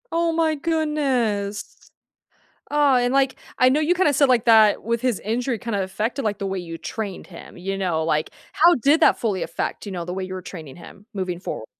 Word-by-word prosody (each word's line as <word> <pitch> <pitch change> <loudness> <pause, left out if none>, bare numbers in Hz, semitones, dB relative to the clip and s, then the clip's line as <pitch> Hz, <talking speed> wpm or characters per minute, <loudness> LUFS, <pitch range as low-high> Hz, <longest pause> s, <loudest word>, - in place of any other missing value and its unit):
Oh, 335 0 +1
my 320 -1 +1
goodness. 275 -10 -1 0.9
Aw, 290 -3 +4
and, 245 +1 +1
like, 270 -1 +2 0.2
I 255 - +6
know 275 +4 +2
you, 310 +3 +2
kinda, 360 -4 +2
said 280 +1 +4
like 245 -2 +3
that, 220 -3 +5
with 230 +1 -1
his 250 -5 0
injury, 235 +2 -2
kind 230 0 -3
of, 195 - 0
affected, 220 +8 -3
like, 205 -1 -1
the 200 - -2
way 190 0 -3
you 165 -2 -7
trained 205 -5 -6
him, 175 -1 -12
you 195 +2 -4
know, 175 -5 -1
like, 155 -1 0 0.2
how 340 +2 +6
did 285 +7 +3
that - - +5
fully 205 -6 -1
affect, - - -4
you 200 - -6
know, 175 -2 -4
the 180 - -5
way 190 0 -4
you 185 0 -6
were 185 - -5
training 160 -7 -9
him 195 +3 -14
moving 185 -3 -3
forwar 110 - -6
225 Hz, 220 wpm, -22 LUFS, 190-275 Hz, 0.9 s, I